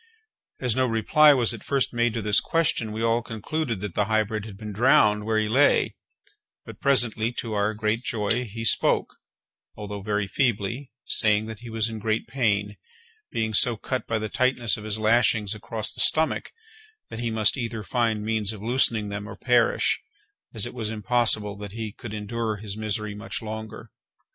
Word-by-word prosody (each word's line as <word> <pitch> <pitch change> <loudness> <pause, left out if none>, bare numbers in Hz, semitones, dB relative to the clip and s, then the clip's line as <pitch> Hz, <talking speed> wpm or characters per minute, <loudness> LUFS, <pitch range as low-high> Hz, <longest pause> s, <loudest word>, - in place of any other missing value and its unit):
As 125 -4 +1
no 130 0 +2
reply 135 +7 +5
was 120 -3 +1
at 115 - -9
first 135 -2 0
made 120 -1 +1
to 115 - -2
this 105 0 +4
question, 155 -9 +1
we 110 +1 -3
all 115 +1 +2
concluded 115 +1 -4
that 105 -4 -5
the - - +1
hybrid 110 0 0
had 105 -3 -10
been 105 0 -7
drowned 105 -1 +3
where 110 -1 +1
he 110 0 +1
lay; 135 +6 +3 0.7
but - - -11
presently, 120 -4 +3
to 115 -2 -4
our 105 +1 0
great 110 +2 -1
joy, 115 0 +1
he 115 +1 -6
spoke, - - +1 0.6
although 105 -1 -6
very 105 0 -1
feebly, 120 +3 -1 0.2
saying 105 0 +2
that 110 -1 -8
he 120 0 -10
was 110 -1 0
in 110 -1 -6
great 110 +1 -1
pain, 105 -5 -1 0.5
being 110 -1 -1
so 115 +2 +3
cut 130 +4 -4
by 115 - 0
the 110 0 -3
tightness 125 0 +1
of 105 - -9
his 110 0 -2
lashings 110 -2 +2
across 110 0 -5
the - - 0
stomach, 160 0 +3 0.6
that 110 - -6
he 120 -1 -1
must 110 -2 +2
either 115 -4 -4
find 115 -1 0
means 110 -2 -1
of 110 - -9
loosening 115 -3 +1
them 100 +1 -5
or - - -8
perish, 120 -2 +2 0.5
as - - 0
it - - -7
was 115 -4 -3
impossible 110 -2 +2
that 100 -1 -8
he 110 -1 -5
could 110 -3 -8
endure 110 +1 -3
his 100 -1 -6
misery 110 -1 -3
much 105 +2 -5
longer. 110 0 -8
110 Hz, 185 wpm, -25 LUFS, 105-120 Hz, 0.7 s, reply